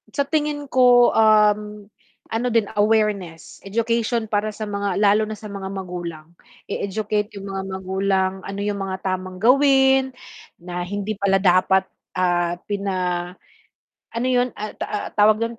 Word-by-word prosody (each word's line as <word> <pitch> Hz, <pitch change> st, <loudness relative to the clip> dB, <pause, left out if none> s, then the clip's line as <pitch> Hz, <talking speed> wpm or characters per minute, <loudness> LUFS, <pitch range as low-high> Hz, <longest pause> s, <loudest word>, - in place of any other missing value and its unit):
Sa 280 Hz, -, -1 dB
tingin 295 Hz, 0 st, -1 dB
ko, 250 Hz, -2 st, +5 dB
uhm, 210 Hz, -1 st, +3 dB, 0.5 s
ano 230 Hz, +2 st, -1 dB
din 230 Hz, -2 st, +3 dB, 0.2 s
awareness 205 Hz, -6 st, 0 dB
education 230 Hz, +2 st, 0 dB
para 215 Hz, 0 st, -2 dB
sa 215 Hz, -, -5 dB
mga 200 Hz, -2 st, -2 dB
lalo 210 Hz, +1 st, +4 dB
na 215 Hz, -, -5 dB
sa 210 Hz, 0 st, -10 dB
mga 195 Hz, -1 st, -6 dB
magulang, 175 Hz, -4 st, -6 dB, 0.3 s
e -, -, -4 dB
educate 210 Hz, +1 st, -1 dB
yung 195 Hz, 0 st, -7 dB
mga 195 Hz, 0 st, -3 dB
magulang 190 Hz, 0 st, -1 dB
ano 195 Hz, 0 st, -5 dB
yung 205 Hz, -1 st, -2 dB
mga 190 Hz, -1 st, -4 dB
tamang 185 Hz, -1 st, -3 dB
gawin 265 Hz, +3 st, +4 dB, 0.4 s
na 175 Hz, 0 st, -6 dB
hindi 205 Hz, +2 st, -3 dB
pala 195 Hz, -1 st, +3 dB
dapat, 190 Hz, +1 st, +4 dB, 0.3 s
ah, 175 Hz, -1 st, +1 dB
pina 200 Hz, -2 st, -2 dB, 1.2 s
ano 235 Hz, +2 st, -1 dB
yun, 250 Hz, -1 st, +2 dB
ah, 215 Hz, 0 st, -5 dB
ta, -, -, -3 dB
ah, 210 Hz, -, -3 dB
tawag 210 Hz, +1 st, +5 dB
dun 230 Hz, 0 st, -3 dB
205 Hz, 150 wpm, -22 LUFS, 190-225 Hz, 1.2 s, ko